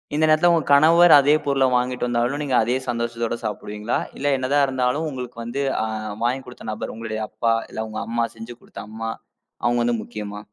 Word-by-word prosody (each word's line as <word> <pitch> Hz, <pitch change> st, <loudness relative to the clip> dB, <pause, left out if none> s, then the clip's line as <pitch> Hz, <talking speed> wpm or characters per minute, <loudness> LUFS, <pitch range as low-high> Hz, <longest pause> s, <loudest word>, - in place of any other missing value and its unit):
இந்த 155 Hz, -, +1 dB
நேரத்துல 155 Hz, +3 st, +5 dB
உங்க 165 Hz, -2 st, +2 dB
கணவர் 165 Hz, +4 st, +7 dB
அதே 145 Hz, +2 st, +4 dB
பொருள 135 Hz, -1 st, +3 dB
வாங்கிட்டு 125 Hz, 0 st, -1 dB
வந்தாலும் 120 Hz, +4 st, 0 dB
நீங்க 135 Hz, -3 st, 0 dB
அதே 120 Hz, +3 st, 0 dB
சந்தோஷத்தோடு 120 Hz, -1 st, -2 dB
சாப்பிடுவீங்களா, 105 Hz, +1 st, -3 dB, 0.2 s
இல்ல 145 Hz, +1 st, 0 dB
என்னதான் 140 Hz, +2 st, +2 dB
இருந்தாலும் 130 Hz, +4 st, 0 dB
உங்களுக்கு 125 Hz, -3 st, -7 dB
வந்து, 130 Hz, +4 st, -3 dB, 0.2 s
அ -, -, 0 dB, 0.4 s
வாங்கிக் 130 Hz, +2 st, -1 dB
கொடுத்த 125 Hz, -, -11 dB
நபர் 110 Hz, -, -5 dB
உங்களுடய 110 Hz, -1 st, -5 dB
அப்பா 115 Hz, +1 st, 0 dB, 0.2 s
இல்ல 110 Hz, -, -4 dB
உங்க 110 Hz, -, -5 dB
அம்மா 115 Hz, 0 st, 0 dB
செஞ்சு 115 Hz, +2 st, -8 dB
கொடுத்த -, -, -10 dB
அம்மா 115 Hz, +1 st, -4 dB, 0.5 s
அவங்க 120 Hz, 0 st, +2 dB
வந்து 120 Hz, 0 st, +1 dB
முக்கியமா? 105 Hz, -2 st, -7 dB
125 Hz, 180 wpm, -22 LUFS, 115-140 Hz, 0.5 s, கணவர்